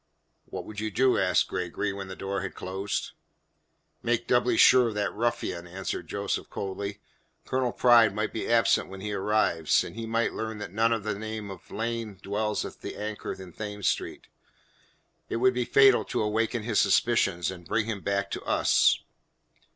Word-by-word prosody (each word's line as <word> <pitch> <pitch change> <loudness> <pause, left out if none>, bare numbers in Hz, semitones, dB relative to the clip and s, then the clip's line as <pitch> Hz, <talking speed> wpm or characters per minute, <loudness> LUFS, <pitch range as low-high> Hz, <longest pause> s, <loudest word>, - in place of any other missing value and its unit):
"What - - -7
would 105 -1 -7
you 110 0 -2
do?" 130 +4 +3
asked 90 -1 +2
Gregory 95 +3 -2
when 95 -1 -6
the 95 - -7
door 100 +1 -3
had 100 - -5
closed. 95 +2 -3 0.9
"Make 120 0 0
doubly 125 0 +2
sure 125 -1 +7
of 110 - -4
that 105 -1 -1
ruffian," 105 -6 -2
answered 95 +2 -5
Joseph - - -3
coldly. 100 +1 -5 0.5
"Colonel 130 -2 0
Pride 120 -3 +6
might 105 0 -2
be 110 - -3
absent 115 -4 +3
when 95 0 -9
he 105 +1 -3
arrives, 95 -6 +2
and - - -8
he 115 0 -5
might 115 +1 0
learn 110 -1 -4
that 105 -4 -6
none 115 +2 +2
of 115 -3 0
the 110 - -1
name 110 -2 -5
of 95 - -12
Lane 115 -2 -3
dwells 105 +2 -2
at - - -9
the - - -6
Anchor 105 0 -4
in 95 -2 -11
Thames 105 -1 -4
Street. - - -2 1.0
It - - -2
would 130 +2 +3
be 125 -1 -1
fatal 135 -1 +6
to - - -1
awaken 110 +2 0
his 110 -2 +1
suspicions 95 -4 +2
and 90 -2 -11
bring 105 +1 +1
him 110 -3 -4
back 100 0 -1
to - - -3
us." - - +3
105 Hz, 180 wpm, -27 LUFS, 100-115 Hz, 1.0 s, sure